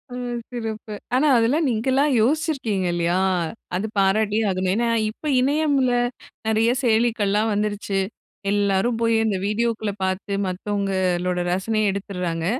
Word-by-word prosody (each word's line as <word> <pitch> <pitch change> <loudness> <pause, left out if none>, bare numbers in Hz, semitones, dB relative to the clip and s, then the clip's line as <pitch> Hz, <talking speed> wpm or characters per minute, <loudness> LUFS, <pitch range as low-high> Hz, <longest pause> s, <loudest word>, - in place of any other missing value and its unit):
ம். 245 -1 -3
சிறப்பு. 220 -3 -5 0.2
ஆனா, 295 +4 +3
அதெல்லாம் 270 +7 +2
நீங்களா 260 +5 +1 0.2
யோசிச்சிருக்கீங்க 260 - 0
இல்லயா? 175 +1 +1 0.6
அது 195 +4 -1
பாராட்டியே 210 +2 +2
ஆகணும். 185 0 0
ஏன்னா, 235 +1 +1 0.2
இப்ப 295 +7 -4
இணையம்ல 280 -2 +2 0.6
நிறைய 225 +2 +3
செயலிக்கள்லாம் 220 -2 +2
வந்துருச்சு. 205 -1 -1 0.5
எல்லாரும் 205 +3 +1
போய் 230 0 +3
அந்த 205 -3 0
வீடியோக்குள்ள 215 0 -1
பார்த்து, 190 +2 -2
மத்தவங்களோட 185 -2 -1 0.2
ரசனயை 215 +2 0
எடுத்துர்றாங்க. 180 -4 -3
215 Hz, 115 wpm, -23 LUFS, 195-235 Hz, 0.6 s, ஆனா